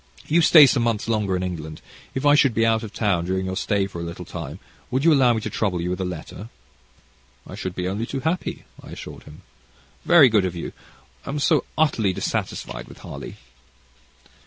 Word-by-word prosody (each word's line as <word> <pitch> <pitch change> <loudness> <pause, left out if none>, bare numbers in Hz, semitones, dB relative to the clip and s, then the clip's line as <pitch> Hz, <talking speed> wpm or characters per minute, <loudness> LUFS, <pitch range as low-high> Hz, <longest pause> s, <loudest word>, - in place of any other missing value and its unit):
"You 170 +3 +3
stay 160 -2 +9
some 130 -2 +2
months 115 -2 -1
longer 105 -4 0
in 90 - -2
England. 80 -4 -5 0.4
If 130 +2 -2
I 145 - +6
should 140 -5 +4
be 115 - +3
out 110 -1 +2
of 110 -3 -7
town 100 -6 0
during 95 +1 -1
your 95 0 -3
stay 100 +1 0
for 90 -3 -7
a - - -4
little 85 +1 -7
time, 80 -3 -7 0.3
would 135 +3 -1
you 165 - +6
allow 130 -4 +5
me 110 - -2
to - - -4
trouble 95 -5 -1
you 90 +1 -2
with 90 +1 -3
a - - -1
letter?" 90 +4 -7 1.0
"I - - -11
should 95 -1 -5
be 90 0 -2
only 105 +5 -3
too 135 - -4
happy," 165 +5 -2 0.2
I - - -13
assured - - -10
him. 75 +5 -14 0.6
"Very 160 -6 +7
good 110 -4 +3
of 90 -2 -2
you. 85 - -6 0.5
I - - -9
am 145 - -2
so 150 +1 +2
utterly 115 -11 +2
dissatisfied - - -4
with - - -13
Harley." - - -9
105 Hz, 210 wpm, -23 LUFS, 90-130 Hz, 1.0 s, stay